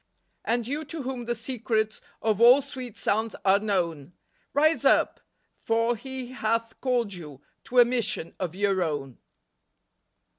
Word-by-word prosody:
And 235 0 0
you 290 +4 -2
to 325 -4 -6
whom 255 -2 -4
the 240 0 -1
secrets 225 -2 -2 0.2
Of 220 -1 +1
all 250 +4 +8
sweet 255 -4 -8
sounds 220 +2 0
are 195 +1 +5
known. 175 -7 -2 0.4
Rise 310 +3 +3
up! - - +3 0.4
for 230 +1 +1
He 260 +1 -7
hath 230 -2 -2
called 245 -6 0
you 150 -7 -9 0.3
To 250 - -4
a 240 - +9
mission 230 -8 -1
of 180 -2 -3
your 195 -1 +1
own." 145 -6 -3
230 Hz, 145 wpm, -26 LUFS, 200-250 Hz, 0.4 s, a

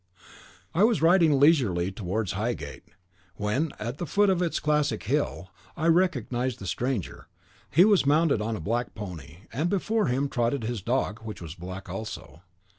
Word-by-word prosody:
I 180 - +3
was 220 -7 +3
riding 165 -4 +5
leisurely 120 - +3
towards 100 +1 -2
Highgate, 105 -8 -4 0.5
when, 105 - -1
at 120 +6 -5
the 175 - -3
foot 205 -1 +3
of 180 -1 +1
its 170 -2 0
classic 150 -6 0
hill, 120 -7 -1 0.3
I 160 - -2
recognised 160 -8 +1
the 100 - -9
stranger; 120 0 -3 0.4
he 170 +6 +6
was 205 -3 +4
mounted 145 -4 +3
on 110 +1 -2
a - - -5
black 115 +8 -2
pony, 85 -4 -8
and 155 +8 0
before 210 +3 +1
him 135 +3 +1
trotted 120 0 -1
his 115 -2 -3
dog, 115 0 -1
which 110 -1 -8
was 80 -3 -7
black 95 +2 -8
also. 95 -3 -7
120 Hz, 165 wpm, -27 LUFS, 100-160 Hz, 0.5 s, he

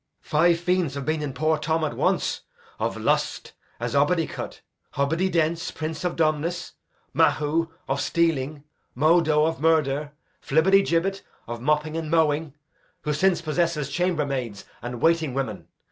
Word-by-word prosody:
Five 170 +2 +3
fiends 175 -4 0
have 140 -2 -4
been 155 +1 0
in 145 -2 -3
poor 155 +3 +1
Tom 160 +1 0
at 155 - -1
once: - - 0 0.4
of - - -1
lust, - - -1 0.3
as - - -3
Obidicut; - - 0 0.3
Hobbididence, 165 +2 0
prince 155 +1 -4
of 180 -1 -1
dumbness; 165 +2 0 0.4
Mahu, 160 +2 +2 0.2
of 135 +1 -1
stealing; 150 -4 0 0.3
Modo, 155 +1 +4
of 160 -2 -2
murder; 150 -2 +2 0.3
Flibbertigibbet, 190 +3 +2 0.2
of 120 0 -6
mopping 150 +3 +1
and 165 -1 -3
mowing, 155 -2 +1 0.5
who 150 - 0
since 175 +3 +2
possesses 155 -3 0
chambermaids 140 - -1 0.2
and 120 0 -6
waiting 160 -5 +2
women. 135 -6 -3
155 Hz, 130 wpm, -25 LUFS, 145-165 Hz, 0.5 s, Modo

